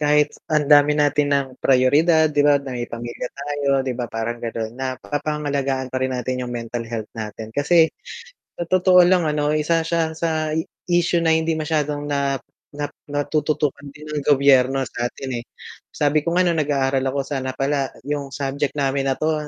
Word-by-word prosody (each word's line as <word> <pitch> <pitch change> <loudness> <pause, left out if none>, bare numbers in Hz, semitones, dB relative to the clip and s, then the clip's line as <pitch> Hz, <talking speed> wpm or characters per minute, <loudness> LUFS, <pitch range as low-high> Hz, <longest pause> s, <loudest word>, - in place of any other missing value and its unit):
kahit 150 0 +3 0.2
ang 150 -2 +2
dami 145 +1 +6
natin 145 0 +2
ng 140 -1 +2
prayoridad, 150 +5 +4
di 145 - +2
ba, 145 0 +5
na 140 -2 -5
may 120 -1 -4
pamilya 120 +1 -5
tayo, 145 0 -4 0.2
di 130 - -1
ba, 120 -1 -4
parang 115 +1 -4
ganun, 115 -1 -4
naapangalagaan 135 +2 -3
pa 130 - -1
rin 130 -1 -1
natin 125 +1 -3
yung - - -5
mental 115 0 -5
health 110 -2 -5
natin. 110 0 -7
Kasi 160 +4 +3 0.7
sa - - 0
totoo 185 0 +5
lang 180 -2 +4
ano, 150 0 0
isa 165 +2 +2
siya 165 -1 0
sa 160 -1 -1 0.4
issue 175 0 +2
na 160 - +3
hindi 160 0 +1
masyadong 150 -2 -1
na 140 -1 0 0.4
na 145 0 -4 0.2
natututukan 145 0 -1
din 150 +2 -12
ng 150 - -1
gobyerno 135 -2 +4
sa 120 -1 -3
atin 130 -1 -5
eh. 120 - -8 0.5
Sabi 145 +1 +2
ko, 170 +3 -2
nung 175 -3 +2
nag-aaral 135 -2 +1
ako 135 +1 -1
sana 130 -2 -4
pala 135 0 0 0.2
yung 145 -1 -3
subject 140 +1 -2
namin 135 -1 0
na 135 - +1
'to, 155 -1 -1
145 Hz, 175 wpm, -21 LUFS, 130-150 Hz, 0.7 s, dami